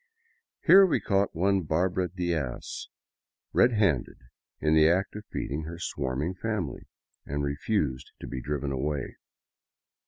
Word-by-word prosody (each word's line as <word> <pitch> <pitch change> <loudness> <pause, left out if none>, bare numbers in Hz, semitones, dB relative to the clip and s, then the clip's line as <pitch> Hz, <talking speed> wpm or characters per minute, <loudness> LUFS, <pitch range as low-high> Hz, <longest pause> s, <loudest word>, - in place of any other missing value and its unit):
Here 195 +1 +9
we 185 - +3
caught 100 -3 +1
one 95 +3 +2
Barbara 90 +3 0
Diaz 85 -8 -3 0.7
red 120 0 +5
handed 95 - +1 0.4
in 75 0 +2
the 80 0 +6
act 95 +4 +1
of 105 0 -7
feeding 75 +4 -3
her 85 +1 -7
swarming 70 0 -2
family, 95 -4 -3 0.4
and 70 +1 -3
refused 70 - -1
to - - -8
be 65 -2 -5
driven 70 0 -2
away. 70 +2 -2
80 Hz, 130 wpm, -28 LUFS, 70-95 Hz, 0.7 s, Here